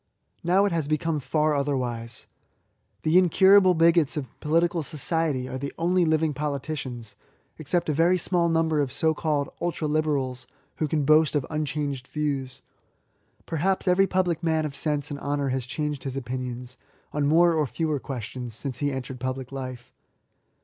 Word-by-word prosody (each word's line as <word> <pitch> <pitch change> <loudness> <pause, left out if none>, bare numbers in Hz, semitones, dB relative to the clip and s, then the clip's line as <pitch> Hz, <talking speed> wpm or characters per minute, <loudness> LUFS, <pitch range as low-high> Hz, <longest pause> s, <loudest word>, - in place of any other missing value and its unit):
Now 185 +4 +4
it 200 - +1
has 165 -4 0
become 155 +1 0
far 155 +2 +1
otherwise. 125 -5 -2 0.8
The 160 +3 +5
incurable 185 +1 +6
bigots 165 -2 +3
of 145 - -2
political 165 +2 +1
society 150 -3 -1
are 130 - -5
the 140 +1 -4
only 175 +1 +2
living 160 -1 +2
politicians, 140 -5 -4 0.4
except 170 +3 -1
a 155 - +1
very 170 +5 +3
small 175 0 +1
number 160 -2 +2
of 135 -3 -1
so 160 +3 +2
called 150 -2 -1
ultra 170 -2 -1
liberals, 145 -5 -1 0.3
who 155 - 0
can 150 -1 0
boast 155 +1 +4
of 145 -3 +1
unchanged 145 -3 -2
views* 140 -4 -3 0.8
Perhaps 185 +5 0
every 190 +2 +4
public 180 -4 0
man 160 -2 +1
of 140 -2 -5
sense 145 0 -1
and 140 - -4
honour 140 -1 -1
has 130 -1 -2
changed 150 0 -3
his 135 -1 -4
opinions, 125 -1 -5 0.4
on 145 -1 +1
more 170 +3 +5
or 155 -3 +1
fewer 155 0 -1
questions, 125 -2 -6
since 130 +1 -5
he 145 -1 0
entered 130 -1 -5
public 130 0 -4
life. 130 -2 -7
150 Hz, 160 wpm, -26 LUFS, 135-165 Hz, 0.8 s, incurable